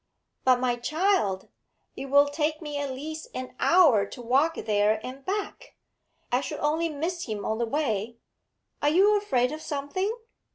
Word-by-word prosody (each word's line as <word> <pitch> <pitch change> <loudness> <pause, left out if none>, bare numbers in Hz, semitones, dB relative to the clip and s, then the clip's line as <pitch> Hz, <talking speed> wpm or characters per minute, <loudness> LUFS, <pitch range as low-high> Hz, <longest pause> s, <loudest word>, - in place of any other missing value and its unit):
But, 255 -1 +4
my 245 -1 0
child, 305 - 0 0.5
it - - -6
will 285 +1 +6
take 305 +1 -1
me 295 -3 -5
at 285 -1 -2
least 310 +4 -6
an 255 -1 -6
hour 310 - +5
to 250 - -10
walk 270 +7 +2
there 210 0 +1
and 265 +2 -8
back! 405 +5 -4 0.6
I 250 +2 +2
should 300 - -5
only 320 +3 +1
miss 335 +4 -3
him 210 -2 -4
on 220 +1 -1
the 235 - 0
way. 230 -5 -1 0.6
Are 290 - +3
you 390 +7 +5
afraid 260 -12 +1
of 310 +1 -6
something? 295 +9 -2
285 Hz, 165 wpm, -27 LUFS, 245-315 Hz, 0.6 s, will